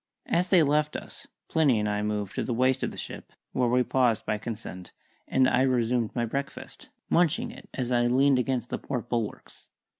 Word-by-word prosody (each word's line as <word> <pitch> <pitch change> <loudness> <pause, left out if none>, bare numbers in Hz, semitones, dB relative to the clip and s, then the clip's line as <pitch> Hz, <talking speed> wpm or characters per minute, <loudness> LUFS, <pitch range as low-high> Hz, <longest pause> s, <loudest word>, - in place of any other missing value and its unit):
As 175 +2 +1
they 180 -3 +5
left 150 +1 +1
us, - - -8 0.2
Plinny 145 -8 +3
and 105 - 0
I 105 0 -1
moved 105 -2 -2
to - - -2
the 120 - -2
waist 130 +2 +2
of - - 0
the - - -11
ship, - - -7 0.2
where 125 -2 +1
we 125 +1 +3
paused 125 -4 +1
by 105 - -1
consent, 105 -5 -7 0.3
and 130 -1 +3
I 130 - +3
resumed 120 -3 +1
my 120 -1 +1
breakfast, 140 +5 -6 0.2
munching 180 +8 +2
it - - -13
as 125 -2 -2
I 120 -1 +3
leaned 135 +2 +4
against 125 -2 -1
the - - -2
port 125 -4 -4
bulwarks. 115 -3 -4
125 Hz, 200 wpm, -27 LUFS, 115-140 Hz, 0.3 s, they